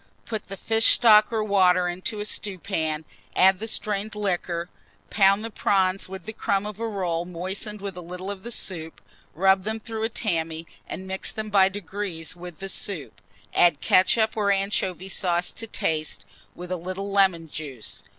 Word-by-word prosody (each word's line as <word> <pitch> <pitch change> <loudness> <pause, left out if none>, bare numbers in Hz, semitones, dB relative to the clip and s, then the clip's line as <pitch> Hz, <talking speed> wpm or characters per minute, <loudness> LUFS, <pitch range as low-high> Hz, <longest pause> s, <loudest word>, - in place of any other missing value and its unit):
Put 220 -2 -4
the 195 - -8
fish 225 +3 +5
stock 215 -2 +6
or 220 -2 0
water 185 -3 +4
into 185 +5 -3
a - - -2
stewpan; 165 -7 -2 0.3
add 190 0 +5
the 225 - -4
strained 215 -1 -2
liquor, 175 -4 -1 0.4
pound 200 +1 +4
the 225 - -5
prawns 190 -2 +1
with 190 -2 -8
the 220 - -5
crumb 200 -1 0
of 210 0 -6
a 230 - -1
roll 180 -6 -1
moistened 190 +4 -5
with 200 -2 -5
a 180 - -7
little 180 +3 -6
of 195 -2 -7
the 235 - -7
soup, 165 -7 -3 0.4
rub 190 +2 +4
them 220 +2 -3
through 220 0 -6
a 225 - +1
tammy, 165 -8 -2 0.2
and 190 - -6
mix 190 0 0
them 215 -1 -5
by 195 -2 +6
degrees 190 -4 -4
with 175 -2 -9
the 195 - -6
soup; 190 -4 -3 0.3
add 170 -5 +4
ketchup 220 +4 +3
or 205 -2 +2
anchovy 195 -2 -1
sauce 175 -2 0
to 225 - -6
taste, 155 - -2 0.3
with 180 +1 -8
a 185 - 0
little 185 +3 -4
lemon 190 -5 +3
juice. 140 -7 -7
190 Hz, 180 wpm, -25 LUFS, 175-210 Hz, 0.4 s, stock